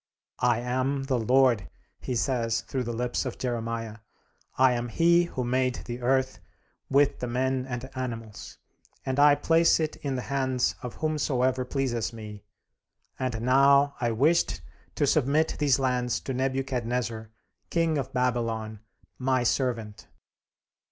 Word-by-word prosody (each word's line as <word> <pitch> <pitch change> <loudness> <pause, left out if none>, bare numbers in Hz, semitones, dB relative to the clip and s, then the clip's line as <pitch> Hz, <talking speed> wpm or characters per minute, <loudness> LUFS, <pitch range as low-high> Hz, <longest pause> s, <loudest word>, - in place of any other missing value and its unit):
"I 120 -1 +2
am 130 +3 -1
the 135 -2 0
Lord," 125 -2 +3 0.3
he 125 - -4
says 115 -2 0
through 130 0 -4
the 120 - -3
lips 120 +1 -2
of 130 -3 -5
Jeremiah; 115 -3 -3 0.6
"I 130 0 +5
am 120 0 -2
he 170 +6 +4
who 130 -6 -4
made 130 +1 0
the 120 +1 -6
earth, 130 +1 +1 0.5
with 140 +1 +3
the 125 - -3
men 130 +1 -1
and 125 0 -5
animals; 115 -4 -6 0.5
and 130 +1 -1
I 145 0 +7
place 165 +4 +3
it 155 -1 -2
in 140 -2 -3
the 125 - -3
hands 130 -2 0
of 125 - -7
whomsoever 130 -5 0
pleases 125 -4 -2
me; 105 -2 -9 0.8
and 125 -3 -2
now 140 +3 +4
I 120 - +1
wished 145 +10 +2 0.3
to 145 - +2
submit 150 +3 +2
these 140 -4 +3
lands 125 -2 0
to 135 - -4
Nebuchadnezzar, 125 -4 -2 0.4
King 165 -3 +1
of 135 0 -4
Babylon, 115 -4 -1 0.4
my 130 -1 +1
servant." 115 -4 -1
130 Hz, 140 wpm, -27 LUFS, 120-135 Hz, 0.8 s, I